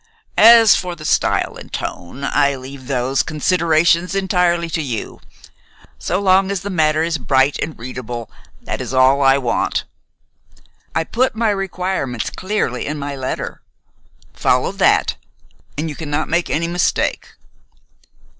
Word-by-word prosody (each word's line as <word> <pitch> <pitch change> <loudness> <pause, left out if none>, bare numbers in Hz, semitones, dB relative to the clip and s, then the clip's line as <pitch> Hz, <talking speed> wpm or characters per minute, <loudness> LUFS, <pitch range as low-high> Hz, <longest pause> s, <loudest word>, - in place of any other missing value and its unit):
As 225 -2 +8
for 180 -1 -3
the 155 -2 -11
style - - +1
and - - -12
tone, 105 +11 -6
I 140 0 +2
leave 130 0 -10
those 130 0 0
considerations 170 +2 +1
entirely 180 -3 +1
to 160 - -1
you. 125 -7 -5 0.8
So 75 - -1
long 190 -1 +3
as 200 -2 -2
the 200 - -5
matter 155 -2 +2
is 165 -2 -1
bright 135 +2 +2
and 160 - -4
readable, 120 -1 -6 0.4
that - - -4
is 130 - -4
all 130 +2 +4
I 135 0 +5
want. 120 -4 -1 1.1
I 160 - +2
put 245 +7 0
my 225 -1 +1
requirements 185 - -3
clearly 185 - -2
in 150 +1 -3
my 140 0 -4
letter. 130 -1 -5 0.7
Follow - - +1
that, - - +2 0.6
and 155 +2 -2
you 150 - -5
cannot 150 0 -3
make 170 +1 0
any 165 +2 0
mistake." 175 0 -1
155 Hz, 140 wpm, -18 LUFS, 135-180 Hz, 1.1 s, As